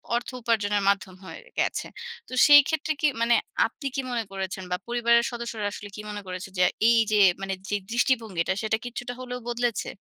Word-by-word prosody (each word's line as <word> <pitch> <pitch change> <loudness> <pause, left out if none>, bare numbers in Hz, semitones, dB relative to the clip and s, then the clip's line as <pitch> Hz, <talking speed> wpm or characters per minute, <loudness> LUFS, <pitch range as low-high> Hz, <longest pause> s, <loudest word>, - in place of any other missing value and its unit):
অর্থ 245 - -2
উপার্জনের 210 -3 +1
মাধ্যম 195 -2 -1
হয়ে - - -9 0.2
গেছে। - - 0 0.4
তো - - -10
সেই 290 0 +10
ক্ষেত্রে 315 0 -1
কি 300 - +5
মানে 235 0 +4 0.3
আপনি 280 - -8
কি 270 - 0
মনে 235 -2 -1
করেছেন 190 -1 -4
বা 180 - +1
পরিবারের 235 0 +3
সদস্যরা 235 -3 -4
আসলে 205 0 -8
কি 210 - -6
মনে 205 0 -5
করেছেন 185 +1 -6
যে - - +6 0.3
এই 235 - +5
যে 210 - +3 0.2
মানে 195 0 -2 0.2
যে 205 - +1 0.2
দৃষ্টিভঙ্গিটা 225 -8 +1
সেটা 220 0 0
কিছুটা 245 +1 -5
হলেও 250 -1 -5
বদলেছে? 240 -1 -1
230 Hz, 185 wpm, -26 LUFS, 205-245 Hz, 0.4 s, সেই